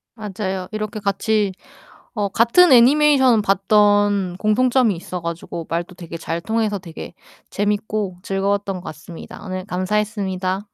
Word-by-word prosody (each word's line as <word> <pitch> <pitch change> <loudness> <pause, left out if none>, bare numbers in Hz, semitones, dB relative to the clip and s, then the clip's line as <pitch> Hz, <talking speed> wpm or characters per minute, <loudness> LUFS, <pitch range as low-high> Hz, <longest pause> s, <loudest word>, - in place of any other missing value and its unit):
맞아요. 195 -4 -4
이렇게 215 0 -4
같이 205 +1 0 0.6
어 205 -3 -1
같은 240 - +4
애니메이션을 260 -1 +5
봤던 205 -1 +2
공통점이 235 +1 +2
있어 180 +1 -6
가지고 170 0 -5
말도 170 +2 -3
되게 170 -2 -8
잘 165 +1 -4
통해서 220 0 -1
되게 170 -2 -9 0.4
재밌고 205 -2 -2
즐거웠던 195 0 -1
것 175 - -10
같습니다. 155 +2 -10
오늘 185 -1 -5
감사했습니다. 190 -1 -2
200 Hz, 325 characters per minute, -20 LUFS, 185-215 Hz, 0.6 s, 애니메이션을